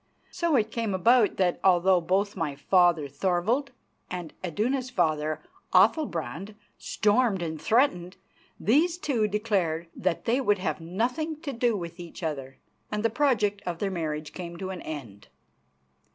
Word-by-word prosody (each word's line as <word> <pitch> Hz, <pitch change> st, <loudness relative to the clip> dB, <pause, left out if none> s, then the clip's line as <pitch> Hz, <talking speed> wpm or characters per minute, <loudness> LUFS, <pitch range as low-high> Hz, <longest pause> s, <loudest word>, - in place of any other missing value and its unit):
So 340 Hz, -4 st, +1 dB
it 220 Hz, -3 st, +1 dB
came 225 Hz, -4 st, -1 dB
about 230 Hz, +4 st, +4 dB
that, 180 Hz, -2 st, +1 dB
although 185 Hz, -1 st, +4 dB
both 195 Hz, +4 st, 0 dB
my 165 Hz, -6 st, -2 dB
father, 175 Hz, 0 st, +3 dB
Thorvald, 190 Hz, -, 0 dB, 0.4 s
and 175 Hz, -3 st, -6 dB
Iduna's 245 Hz, -, -1 dB
father, 155 Hz, -9 st, 0 dB, 0.3 s
Athalbrand, 200 Hz, -, +2 dB, 0.2 s
stormed 210 Hz, -3 st, +1 dB
and 160 Hz, -2 st, -4 dB
threatened, 205 Hz, -7 st, +2 dB, 0.4 s
these 320 Hz, -, +3 dB
two 250 Hz, -11 st, 0 dB
declared 195 Hz, -6 st, -1 dB
that 180 Hz, -3 st, -1 dB
they 245 Hz, +4 st, +2 dB
would 205 Hz, -5 st, +2 dB
have 165 Hz, -4 st, -3 dB
nothing 250 Hz, -, -2 dB
to 285 Hz, -5 st, -4 dB
do 235 Hz, -2 st, +1 dB
with 170 Hz, -1 st, -7 dB
each 175 Hz, +1 st, -9 dB
other, 135 Hz, -4 st, -4 dB, 0.3 s
and 210 Hz, +1 st, -2 dB
the 230 Hz, -, +3 dB
project 220 Hz, -6 st, +1 dB
of 175 Hz, -2 st, -2 dB
their 195 Hz, +2 st, -2 dB
marriage 155 Hz, -4 st, -4 dB
came 170 Hz, -2 st, -7 dB
to 190 Hz, +1 st, -5 dB
an 185 Hz, -, -6 dB
end. 115 Hz, -10 st, -8 dB
190 Hz, 150 wpm, -27 LUFS, 170-230 Hz, 0.4 s, about